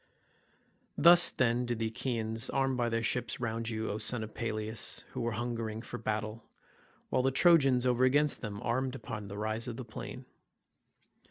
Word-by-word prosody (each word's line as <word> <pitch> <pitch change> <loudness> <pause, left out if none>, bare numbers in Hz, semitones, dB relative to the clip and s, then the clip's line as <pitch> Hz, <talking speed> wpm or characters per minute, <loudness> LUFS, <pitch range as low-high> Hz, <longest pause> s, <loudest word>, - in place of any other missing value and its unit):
Thus, 175 +1 +8
then, 120 -1 +1
did 120 -1 -1
the 115 - -1
Achaeans 110 -1 -2
arm 135 -1 +1
by 120 -1 0
their 115 0 -1
ships 120 -1 -1
round 115 -1 -2
you, 110 -1 -2
O 105 - -3
son 120 -1 0
of 110 - -8
Peleus, 110 -1 -3
who - - -4
were 115 0 -1
hungering 115 -1 -3
for - - -6
battle; 110 0 -3 0.7
while - - +3
the 130 - +2
Trojans 135 -4 +4
over 125 0 +2
against 145 +3 +3
them 105 -3 -5
armed 130 +2 -1
upon 105 -5 -6
the 100 +1 -7
rise 110 +2 -2
of 120 -1 -5
the 130 - -6
plain. 110 - -8
115 Hz, 175 wpm, -31 LUFS, 110-130 Hz, 0.7 s, Thus